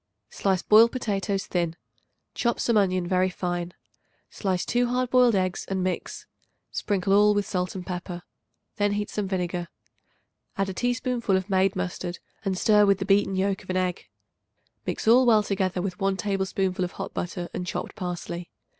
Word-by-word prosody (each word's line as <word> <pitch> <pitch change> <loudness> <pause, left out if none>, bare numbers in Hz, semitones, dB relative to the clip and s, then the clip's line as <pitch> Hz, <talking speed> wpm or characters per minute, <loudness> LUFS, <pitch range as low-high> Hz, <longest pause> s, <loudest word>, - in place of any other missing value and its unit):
Slice 190 -2 0
boiled 225 +2 +7
potatoes 200 -5 -2
thin; 170 -2 -1 0.6
chop 235 -1 0
some 235 - +1
onion 185 -3 +2
very 185 +1 +2
fine; 175 -1 -3 0.6
slice 185 -3 -1
2 245 +1 +1
hard 250 0 -1
boiled 250 -3 +5
eggs 185 -1 0
and 190 -1 -1
mix. 185 -1 -3 0.5
Sprinkle 195 -1 0
all 210 +1 +5
with 205 -1 +1
salt 180 0 -2
and 185 -1 -6
pepper. 175 -1 -5 0.5
Then 205 -1 +2
heat 205 0 -2
some 210 -2 -2
vinegar. 180 -2 -2 0.9
Add 195 0 0
a - - -4
teaspoonful 245 -2 0
of 190 +2 -4
made 190 +1 +3
mustard 180 -1 -3 0.3
and 195 -2 -1
stir 210 +1 +5
with 200 -1 +4
the 190 - -3
beaten 195 0 +3
yolk 195 +1 0
of 185 - -18
an 185 - 0
egg. 180 -1 -2 0.8
Mix - - -3
all 235 -2 +6
together 190 -3 -1
with 185 -2 -4
1 195 0 +1
tablespoonful 190 -1 -1
of 175 - -3
hot 195 0 -6
butter 175 0 -4
and 180 - -4
chopped - - -4
parsley. 175 -3 -5
190 Hz, 170 wpm, -26 LUFS, 180-210 Hz, 0.9 s, boiled